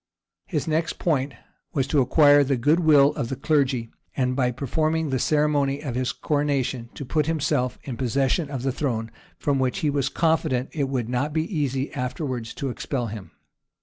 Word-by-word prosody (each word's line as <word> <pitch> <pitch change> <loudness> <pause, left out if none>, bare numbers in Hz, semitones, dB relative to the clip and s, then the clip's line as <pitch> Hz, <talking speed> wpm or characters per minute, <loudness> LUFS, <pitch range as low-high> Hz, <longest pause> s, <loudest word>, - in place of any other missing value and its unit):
His 155 -5 -2
next 160 +1 0
point 140 -5 0 0.4
was 135 -5 +1
to 140 +1 +2
acquire 145 +2 +6
the 135 -1 0
good 150 +8 +3
will 150 -4 +5
of 120 - -3
the 135 - -2
clergy; 135 -4 0 0.3
and 125 -1 +1
by 125 -2 +2
performing 155 +4 -1
the 130 - 0
ceremony 145 -1 +1
of 135 -5 -3
his 125 +1 -1
coronation, 140 -5 -1
to 140 - -6
put 150 +3 0
himself 140 -6 0
in 125 -4 -6
possession 135 +5 0
of 135 -3 -4
the 135 - +1
throne, 115 -5 -2 0.3
from 140 -2 0
which 130 -1 0
he 150 - +1
was 140 -2 0
confident 160 -6 +1
it 140 -4 -1
would 125 -4 -1
not 125 +5 -1
be 155 0 +1
easy 135 -2 -1
afterwards 125 -3 -4
to 135 -2 -3
expel 120 +1 -3
him. 105 -4 -8
140 Hz, 180 wpm, -24 LUFS, 125-150 Hz, 0.4 s, acquire